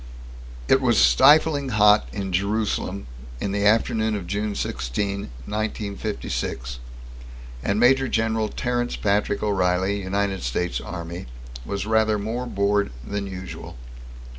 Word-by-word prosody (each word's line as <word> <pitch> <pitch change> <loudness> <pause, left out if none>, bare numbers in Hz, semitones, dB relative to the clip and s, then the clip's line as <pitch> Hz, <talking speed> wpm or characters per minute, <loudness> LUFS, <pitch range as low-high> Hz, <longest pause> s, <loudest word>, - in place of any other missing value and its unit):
_ - - -14 0.7
It 135 - +6
was 120 -4 +3
stifling 145 +2 +5
hot 105 - +5
in 95 +7 -4
Jerusalem 100 -1 -1 0.3
in 100 - -2
the 100 +1 +2
afternoon 110 0 +2
of 100 -4 -4
June 105 +3 -2
16, 100 +10 -3 0.2
1956, 100 - -3 0.8
and 100 +8 0
Major 130 +2 +4
General 110 -2 0
Terence 120 -1 -1
Patrick 100 0 0
O'Reilly, 95 0 +1
United 100 0 -1
States 75 +9 -2
Army, 85 -3 -6 0.4
was 100 0 -3
rather 110 -1 +2
more 115 +5 -3
bored 100 - +1
than 100 +2 -3
usual. 95 -8 -8
100 Hz, 120 wpm, -24 LUFS, 95-110 Hz, 0.8 s, It